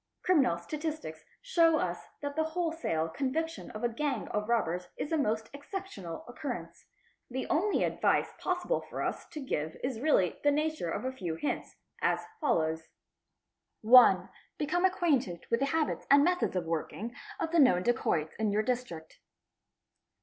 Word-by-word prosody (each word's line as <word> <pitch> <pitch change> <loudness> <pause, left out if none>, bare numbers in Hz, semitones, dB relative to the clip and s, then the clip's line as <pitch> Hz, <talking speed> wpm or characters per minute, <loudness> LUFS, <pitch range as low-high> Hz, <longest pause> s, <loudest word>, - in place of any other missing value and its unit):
Criminal 275 - +3
statistics 300 - -5 0.2
show 335 -10 +4
us 175 - -3 0.2
that 285 0 -3
the 315 - +2
wholesale 320 - -1
conviction 285 - -2
of 215 - -8
a - - +4
gang 275 +4 -2
of 210 +1 -2
robbers 180 -6 0
is 295 - -4
a - - +3
most 220 -6 0
exceptional 285 - -7
occurrence. 270 +4 -6 0.4
The 260 +1 -3
only 365 +6 +2
advice - - +1
possible 365 +6 0
for - - -5
us - - -3
to 320 - -8
give 160 - -3
is 255 -3 -2
really 235 - +3
q - - -19
in - - -28
the - - +3
nature 310 - -2
of 205 - -3
a 260 - 0
few 180 -11 -4
hints, 285 - -3 0.3
as - - +1
follows 160 - 0 0.5
:— - - -56
1. 215 -5 +7 0.3
Become 350 +5 +1
acquainted 280 - +1
with 230 - +3
the 275 - +1
habits 315 +2 -1
and 280 +1 +7
methods 360 - +1
of 180 -2 -1
working 170 +8 -3 0.3
of 330 -3 -2
the 340 - +3
known 185 -11 +5
dacotts 165 -9 +1
of 215 -2 +1
your 210 +1 +2
District. 220 -10 -4
260 Hz, 165 wpm, -31 LUFS, -, 0.5 s, 1